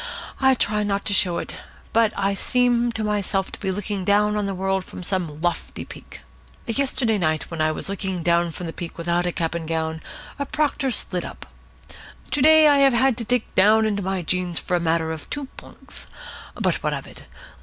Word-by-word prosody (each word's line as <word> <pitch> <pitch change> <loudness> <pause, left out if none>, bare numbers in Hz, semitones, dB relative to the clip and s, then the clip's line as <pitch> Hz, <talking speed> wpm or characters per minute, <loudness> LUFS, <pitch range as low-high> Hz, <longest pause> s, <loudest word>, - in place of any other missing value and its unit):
I 265 -1 +5
try 210 -3 +1
not 200 -1 -1
to 205 - +1
show 180 -3 +2
it, - - -4 0.4
but 225 -2 +4
I 200 0 +1
seem 240 +3 +2
to 220 - -2
myself 200 -2 0
to - - -9
be 195 - -2
looking 200 0 -3
down 210 +2 +3
on 210 -1 0
the 195 - -3
world 190 0 0
from 180 - -9
some 175 -5 -2
lofty 175 -1 -2
peak. - - -11 0.4
Yesterday 235 -3 0
night, 155 -2 0
when 165 -2 -3
I 155 0 +3
was 155 - -1
looking 190 -3 -3
down 170 0 +3
from 175 +3 -7
the 165 - -5
peak 170 -2 -7
without 170 +1 0
a - - 0
cap 165 -1 -2
and 170 -2 -4
gown, 160 0 -2 0.4
a 280 - -2
proctor 295 -2 0
slid 180 -6 -1
up. - - -9 0.9
To 290 - +1
day 315 +2 +7
I 290 -1 +5
had 265 -2 +4
to 235 - -3
dig 245 +1 +1
down 215 +3 +5
into 205 -2 0
my 190 -1 -2
jeans 180 0 -1
for 180 - -1
a - - +2
matter 165 -1 +1
of 160 -2 -7
two 290 -1 -3
plunks. - - -10 0.5
But - - 0
what - - 0
of - - -6
it? - - -12
195 Hz, 210 wpm, -23 LUFS, 175-230 Hz, 0.9 s, day